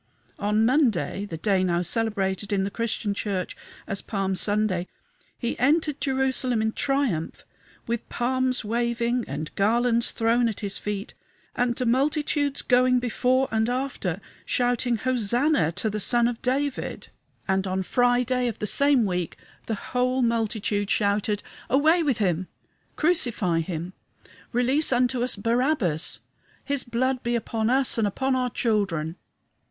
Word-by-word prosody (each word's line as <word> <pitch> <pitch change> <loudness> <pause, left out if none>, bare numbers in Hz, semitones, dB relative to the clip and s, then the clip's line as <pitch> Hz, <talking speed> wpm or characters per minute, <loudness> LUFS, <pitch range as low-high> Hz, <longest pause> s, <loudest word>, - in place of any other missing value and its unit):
On 210 +2 +2
Monday 235 - +1
the 165 -5 -6
day 190 +2 +1
now 175 -1 +1
celebrated 205 0 -1
in 195 -1 +1
the 200 - -2
Christian 220 -2 -2
Church 195 -3 -3 0.3
as 195 - -3
Palm 195 -2 -2
Sunday 190 -1 0 0.5
he 235 - -3
entered 300 +3 +2
Jerusalem 260 -3 +1
in 220 0 +1
triumph, 260 - -1 0.4
with 235 0 -3
palms 255 0 0
waving, 235 +1 0
and 155 - -5
garlands 235 +3 +2
thrown 230 +1 +2
at 220 - -6
his 200 -1 -1
feet, 205 -1 -4 0.4
and 245 -1 +1
the 250 - -2
multitudes 285 +3 +1
going 250 0 +4
before 250 +2 +1
and 220 +1 +1
after, 245 -9 -2 0.2
shouting 245 0 0
Hosanna 245 - +1
to 220 - -2
the 215 0 -2
Son 235 +3 +3
of 240 -1 -4
David; 270 +2 -2 0.4
and 190 0 +1
on 190 0 -1
Friday 245 +2 +2
of 230 - -3
the - - -3
same 280 +1 +3
week 180 -3 -2 0.3
the 225 - -1
whole 255 +4 0
multitude 220 -3 0
shouted, 205 0 +1 0.3
"Away 310 +6 +4
with 280 -7 +1
him! 185 -4 0 0.5
Crucify 240 - +2
him! 170 +1 -4 0.6
Release 260 +6 +2
unto 250 0 +2
us 255 - +3
Barabbas! 230 - +1 0.4
His 280 -2 -1
blood 255 +2 -1
be 240 0 -1
upon 225 -1 -1
us 260 -2 +2
and 215 - +2
upon 265 +6 0
our 250 -1 0
children!" 195 -9 -1
235 Hz, 140 wpm, -25 LUFS, 200-255 Hz, 0.6 s, going